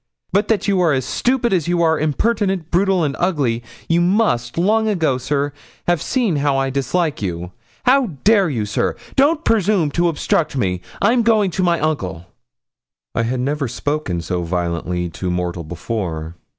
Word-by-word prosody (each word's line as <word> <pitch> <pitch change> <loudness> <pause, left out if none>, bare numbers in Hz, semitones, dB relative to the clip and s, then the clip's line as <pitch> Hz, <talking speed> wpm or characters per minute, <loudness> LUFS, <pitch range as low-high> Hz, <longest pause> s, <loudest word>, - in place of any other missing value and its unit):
But 205 +2 +2
that 215 -2 +1
you 195 -2 +2
are 165 -4 +3
as 130 -2 0
stupid 245 - +1
as 170 -4 +1
you 175 -1 +2
are 160 -1 +3
impertinent, 190 +2 0
brutal, 185 0 +2
and 140 -3 -1
ugly, 140 -10 +1 0.3
you 170 +1 +3
must, 175 - +1
long 220 +5 +2
ago, 160 -11 +1
sir, 140 +2 -1 0.3
have 175 -3 +2
seen 220 - 0
how 140 -1 +1
I 135 0 0
dislike 150 +3 -1
you. 90 -2 -4 0.3
How 265 0 +4 0.2
dare 200 -4 +4
you, 115 -7 -1
sir? 105 - -1 0.2
Don't 300 +4 +3
presume 200 -7 +2
to 175 +4 +2
obstruct 155 -2 0
me; 90 -6 0 0.2
I'm 235 +4 +4
going 215 -4 +3
to 185 - -2
my 175 -2 +2
uncle.' 95 - -2 0.9
I - - 0
had 125 +2 -1
never 140 +1 -1
spoken 125 - -2
so 90 +2 -2
violently 85 0 -2
to 90 +3 -4
mortal 90 -1 -2
before. 85 -1 -4
155 Hz, 170 wpm, -19 LUFS, 115-195 Hz, 0.9 s, How